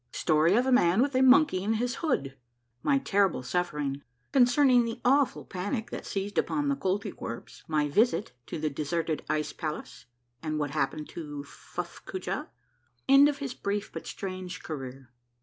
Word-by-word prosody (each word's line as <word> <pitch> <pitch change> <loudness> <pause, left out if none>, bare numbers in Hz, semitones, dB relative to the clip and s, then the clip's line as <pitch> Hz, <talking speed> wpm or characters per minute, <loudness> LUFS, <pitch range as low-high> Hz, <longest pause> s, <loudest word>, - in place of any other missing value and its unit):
— - - -45
STORY 160 +4 +3
OF 245 +3 +3
A 265 - +1
MAN 210 -3 +5
WITH 280 0 -1
A 255 - +3
MONKEY 260 -7 +5
IN 215 +2 +1
HIS 245 +3 -1
HOOD. 140 - -1 0.2
— 120 0 -47
MY 280 - +3
TERRIBLE 200 - +1
SUFFERING. 145 -2 -2 0.2
— 125 - -44
CONCERNING 250 -1 +5
THE 230 +1 -4
AWFUL 275 +2 +3
PANIC 205 +5 -3
THAT - - -6
SEIZED 200 +1 -1
UPON 290 -1 0
THE 280 - +2
KOLTYKWERPS. 190 - -4
— - - -39
MY 150 -2 +2
VISIT 215 - +2 0.2
TO - - -4
THE 155 -1 -1
DESERTED 155 +2 -2
ICE 155 0 -1
PALACE, 155 -6 -6 0.3
AND 155 -1 -2
WHAT 145 -2 -1
HAPPENED 150 +1 -1
TO 145 -3 -6
FUFF 140 - -8
COOJAH. 375 - -4 0.3
— - - -43
END 275 +2 +8
OF 290 - -2
HIS 275 -3 -4
BRIEF 205 0 -3
BUT - - -7
STRANGE 185 -2 -6
CAREER. 135 -4 -7
185 Hz, 185 wpm, -28 LUFS, 150-250 Hz, 0.3 s, END